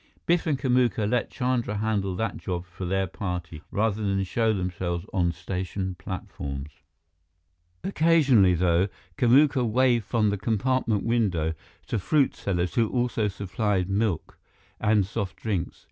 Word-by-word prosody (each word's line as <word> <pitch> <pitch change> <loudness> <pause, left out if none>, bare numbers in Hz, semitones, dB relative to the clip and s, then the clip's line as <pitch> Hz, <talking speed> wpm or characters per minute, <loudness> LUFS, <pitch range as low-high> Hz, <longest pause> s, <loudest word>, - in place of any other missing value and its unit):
Biff 175 0 +2
and 150 -3 +2
Kamuka 125 -5 +2
let 120 +1 0
Chandra 125 -5 -1
handle 100 -3 0
that 110 +1 -2
job 90 -1 -4
for 90 +1 -7
their 95 +2 +1
party, 90 -4 -5
rather 110 0 0
than 100 -1 0
show 110 +4 +1
themselves 90 -3 -2
on 90 -3 +2
station 95 +2 -4
platforms. 75 -6 -6 1.1
Occasionally, 145 - +4
though, 85 +2 +3 0.3
Kamuka 130 +2 +4
waved 120 -1 +2
from 110 -2 +1
the 100 - -2
compartment 115 0 0
window 95 -9 +1 0.3
to 115 - -1
fruit 140 - +2
sellers 90 -2 -1
who 115 -3 +2
also 120 -3 0
supplied 100 -1 -1
milk 100 -4 -1 0.4
and 105 -2 +3
soft 100 -1 -4
drinks. 100 -7 -3
105 Hz, 135 wpm, -26 LUFS, 90-120 Hz, 1.1 s, Occasionally